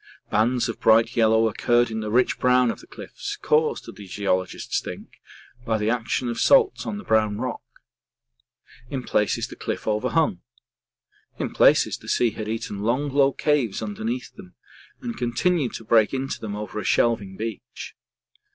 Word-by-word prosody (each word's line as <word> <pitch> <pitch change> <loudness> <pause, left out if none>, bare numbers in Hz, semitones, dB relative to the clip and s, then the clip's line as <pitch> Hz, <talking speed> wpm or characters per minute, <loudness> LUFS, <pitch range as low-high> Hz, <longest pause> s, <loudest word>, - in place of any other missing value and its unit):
Bands 120 +3 +2
of 115 - -5
bright 115 +1 +4
yellow 110 0 +4
occurred 120 +2 +2
in 110 - -3
the 110 -1 -4
rich 125 +3 +2
brown 125 -1 +4
of - - -8
the - - -15
cliffs, - - -7
caused, 155 +1 +1
the 100 -2 -10
geologists 95 -1 -1
think, - - -10 0.4
by 110 -2 0
the 105 +1 0
action 120 +1 -1
of 120 - -3
salts 455 -6 +4
on 205 - -3
the 210 - -8
brown 110 -2 +2
rock. - - -4 1.3
In 135 -3 -4
places 105 -3 0
the - - -10
cliffs - - -4
overhung. 110 - 0 1.0
In - - -3
places, - - +4
the - - -10
sea 120 -2 +2
had 110 0 -6
eaten 110 -2 -4
long 125 +7 0
low 140 0 +3
caves 140 -8 0
deep 110 - -4
under 105 +1 -7
them, 115 -6 -5 0.5
and 120 -1 -5
continued 125 +4 0
to - - -7
break 110 +2 +3
into 135 +1 -3
them 105 -2 -4
over 105 0 -5
a - - -4
shelving 110 -5 +1
beach. 110 -1 -7
115 Hz, 170 wpm, -24 LUFS, 105-125 Hz, 1.3 s, bright